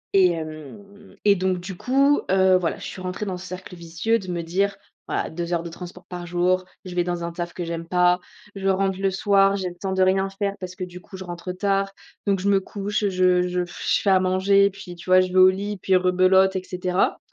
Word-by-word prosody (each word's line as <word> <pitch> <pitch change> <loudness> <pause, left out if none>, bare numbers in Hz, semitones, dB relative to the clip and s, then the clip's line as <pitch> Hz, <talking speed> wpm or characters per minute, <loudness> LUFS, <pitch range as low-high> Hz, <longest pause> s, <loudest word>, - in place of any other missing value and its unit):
Et 185 -2 +6
hem, 165 +5 -8
et 200 -1 +6
donc 185 -1 0
du 180 +2 -7
coup, 275 +8 +2
heu, 190 -1 +4
voilà, 175 -2 -2
je - - -9
suis 185 - -7
rentrée 185 +3 -4
dans 185 -3 -3
ce 185 - -9
cercle 185 0 -8
vicieux 170 +7 -1
de 190 - -10
me 170 -1 -3
dire: 195 +4 0 0.3
«Voilà, - - -2
2 170 +1 -4
heures 170 0 0
de 170 - -7
transport 180 +1 -10
par 175 -1 -7
jour, 180 +1 +1 0.2
je 180 - -7
vais 175 -1 +1
dans 175 -1 -3
un 170 - -3
taf 175 0 -5
que 175 - -5
j'aime 165 0 -5
pas, 180 0 +3 0.4
je 195 0 -3
rentre 190 0 +1
le 195 0 +2
soir, 195 0 +3
j'ai 185 -2 -2
le 175 - -12
temps 190 +2 -4
de 190 0 +2
rien 190 +1 +2
faire 200 0 -2
parce 185 -1 -7
que 185 - -5
du 180 0 -8
coup, 190 - -11
je 190 - -7
rentre 175 +1 -6
tard, 195 +1 0 0.4
donc 195 -2 +2
je 195 - -1
me 200 -1 +4
couche, 205 +2 -3
heu, 205 - +2
je 185 -1 +3
je 180 0 -1
je 175 - -1
fais 200 - +3
à 190 - +5
manger, 195 +2 +3
puis 190 -2 -10
tu 175 +2 -11
vois, 185 0 +7
je 185 - +1
vais 185 - +4
au 185 0 +9
lit, 200 +2 -3
puis 190 - +2
rebelote, 185 +1 +4
et 185 - -2
cetera». 180 0 -1
185 Hz, 250 wpm, -23 LUFS, 180-195 Hz, 0.4 s, au